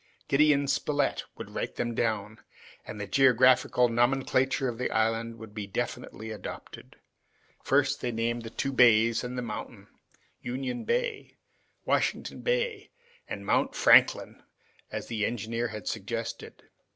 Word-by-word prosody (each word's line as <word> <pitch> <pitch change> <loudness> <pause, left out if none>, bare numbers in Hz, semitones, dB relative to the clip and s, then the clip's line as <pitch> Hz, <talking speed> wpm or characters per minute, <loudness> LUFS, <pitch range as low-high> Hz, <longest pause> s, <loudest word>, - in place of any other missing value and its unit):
Gideon 145 0 +3
Spilett 145 +1 0
would - - -8
write - - -4
them 120 0 -2
down, 110 -1 -2 0.5
and 110 - -7
the 100 - -3
geographical 130 0 +4
nomenclature 130 +2 +1
of 120 -1 -4
the 125 - -1
island 115 +1 0
would 110 -2 -11
be 105 -2 -5
definitely 110 +2 -5
adopted. 105 -4 -9 0.7
First, 140 0 +2
they 125 - -1
named 115 +1 -1
the 115 - -7
two 135 +4 -3
bays 115 -2 +5
and 125 +1 -5
the 125 - -2
mountain, 120 - -7 0.5
Union 125 0 -4
Bay, 485 -2 -2 0.5
Washington - - -1
Bay, 485 -4 -1 0.4
and - - -6
Mount - - +1
Franklin, - - +4 0.5
as - - -5
the 110 -3 -3
engineer 115 +1 -2
had 105 -3 -8
suggested. - - -5
120 Hz, 135 wpm, -28 LUFS, 115-135 Hz, 0.7 s, bays